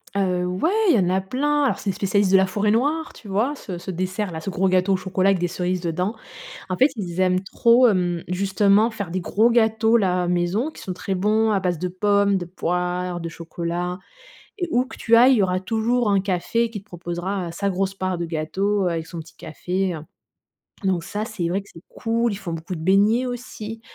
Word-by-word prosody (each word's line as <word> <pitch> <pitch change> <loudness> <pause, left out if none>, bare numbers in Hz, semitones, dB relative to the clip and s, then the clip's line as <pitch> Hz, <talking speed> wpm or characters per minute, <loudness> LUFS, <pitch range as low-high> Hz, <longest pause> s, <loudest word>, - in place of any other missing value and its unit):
Heu, 180 -2 +1
ouais, 185 - 0 0.2
il 305 - +6
y - - +4
en 180 -1 +2
a 190 +1 +1
plein. 290 +8 0
Alors, 270 - +1
c'est 200 - -3
les - - 0
spécialistes 200 0 +1
de 195 - +7
la 190 - +4
Forêt‑Noire. 230 +11 0
Tu 215 - -14
vois? 220 +9 0
Ce 185 -9 -7
ce 180 +2 -6
dessert-là, 185 0 -3
ce 195 - -4
gros 190 +1 +1
gâteau 185 +1 +2
au 190 - +2
chocolat 190 +1 +1
avec 195 -2 +2
des 175 - 0
cerises 180 +1 -2
dedans. 180 +5 -2 0.5
En 185 - 0
fait, 265 - +5
ils 180 -3 -4
aiment 185 0 +2
trop, 235 +5 +4
hem, 175 -4 0
justement 200 +4 +2
faire 200 -6 -5
des 185 0 -2
gros 220 +6 +2
gâteaux-là, 220 -5 +2
maison 180 - 0
qui - - -13
sont 185 - -4
très 190 +1 -3
bons, 215 +4 +2
à 200 - +2
base 180 -3 -1
de 180 - -1
pommes, 200 +1 +2
de 175 - -4
poires, 180 0 -2
de 165 - -4
chocolat 170 +2 -4 0.6
et 355 - -2
où 250 +1 +2
que - - -11
tu 230 0 +3
ailles, 250 +3 +7
il 255 - +4
y - - +4
aura 185 -1 +1
toujours 225 +3 0
un 200 -1 +3
café 200 +5 0
qui 210 - -6
te 195 - -24
proposera, 175 +1 -4
heu, - - -6
sa 200 +4 -1
grosse 190 +1 -1
part 185 -2 -2
de 170 - -2
gâteau 190 +5 -1
avec 165 -2 -2
son 170 - -8
petit 160 - -14
café, 180 +3 -3
heu. 160 - -5 0.9
Donc 185 -3 +1
ça, 210 +4 -3
c'est 210 -7 -3
vrai 195 +3 -1
que 200 - -20
c'est 165 - -13
cool. 230 0 -1
Ils 200 - -4
font 190 -4 -6
beaucoup 165 +3 -5
de 160 - -7
beignets 205 +7 +3
aussi. 225 -3 -6
190 Hz, 225 wpm, -23 LUFS, 180-215 Hz, 0.9 s, de